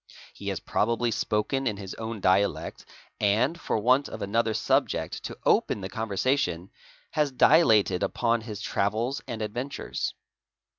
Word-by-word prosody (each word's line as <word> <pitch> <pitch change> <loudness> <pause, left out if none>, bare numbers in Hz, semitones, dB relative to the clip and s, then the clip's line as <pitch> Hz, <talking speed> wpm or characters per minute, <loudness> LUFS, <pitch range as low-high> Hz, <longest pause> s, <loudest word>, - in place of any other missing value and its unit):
He - - -9
has - - -1
probably 115 +2 0
spoken 125 +3 0
in 105 -3 -1
his 95 -2 -7
own 110 -2 -6
dialect 95 +2 +1 0.4
ar 110 +8 +3
for 170 - -2
want 130 +6 +3
of - - -6
another 110 +2 0
subject - - 0
to - - -6
open 105 - +2
the 95 - -5
conversation, 105 -4 -1 0.4
has 150 -2 +1
dilated 110 - +4
upon 115 -1 +1
h 105 -1 -6
travels 110 +7 -1
and 110 -2 -4
adventures. 120 +6 -4
110 Hz, 140 wpm, -27 LUFS, 100-125 Hz, 0.4 s, dilated